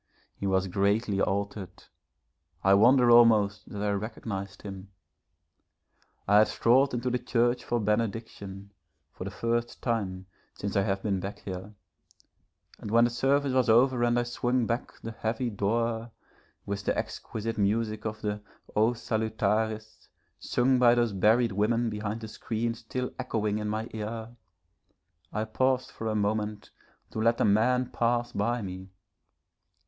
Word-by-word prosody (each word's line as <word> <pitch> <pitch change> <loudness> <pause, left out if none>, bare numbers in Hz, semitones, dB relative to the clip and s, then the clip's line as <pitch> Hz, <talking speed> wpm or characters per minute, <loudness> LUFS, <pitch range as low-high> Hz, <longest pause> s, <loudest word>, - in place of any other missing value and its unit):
He 100 - -3
was 95 0 +1
greatly 100 +2 +1
altered, 100 -1 -3 0.8
I 95 - +5
wonder 120 +4 +6
almost 110 -4 +5
that 105 -1 -5
I 105 - +1
recognised 100 -2 -5
him. 100 -1 -8 1.4
I 105 +1 +6
had 110 - +5
strolled 130 +3 +3
into 125 +1 -1
the 125 - 0
church 120 0 +1
for 120 - -1
benediction, 105 -2 -3 0.4
for 90 - -7
the - - -3
first 115 +4 -2
time 95 -6 -2 0.3
since 100 - -4
I 100 - +4
have 95 0 -1
been 100 -3 0
back 100 +2 -5
here, 95 +2 -7 1.0
and - - -7
when 115 +2 +5
the 120 - +2
service 135 +3 +1
was 130 -2 +2
over 125 +2 +4
and 120 0 +2
I 120 - +2
swung 120 0 0
back 115 +3 -2
the 115 - -4
heavy 115 +2 -2
door, 115 +3 -1 0.6
with 100 0 -4
the - - 0
exquisite 115 +1 -4
music 110 +1 0
of 110 0 -4
the 105 0 -2 0.3
'O 110 +3 +3
Salutaris,' 110 -1 -2 0.3
sung 125 +1 +2
by 120 -1 +6
those 120 -3 +1
buried 110 +4 +3
women 115 +4 +1
behind 105 +1 -4
the 110 - -6
screen 115 +1 -3
still 125 +2 -5
echoing 110 -4 -1
in 105 0 -3
my 110 +2 -2
ear, 110 +2 -5 1.0
I 110 - -1
paused 130 +3 0
a 110 -1 -1
moment 105 0 -2 0.4
to - - -4
let 115 +1 +2
a - - +3
man 125 +5 +2
pass 120 0 0
by 115 +3 -1
me. 95 0 -7
110 Hz, 150 wpm, -28 LUFS, 100-120 Hz, 1.4 s, wonder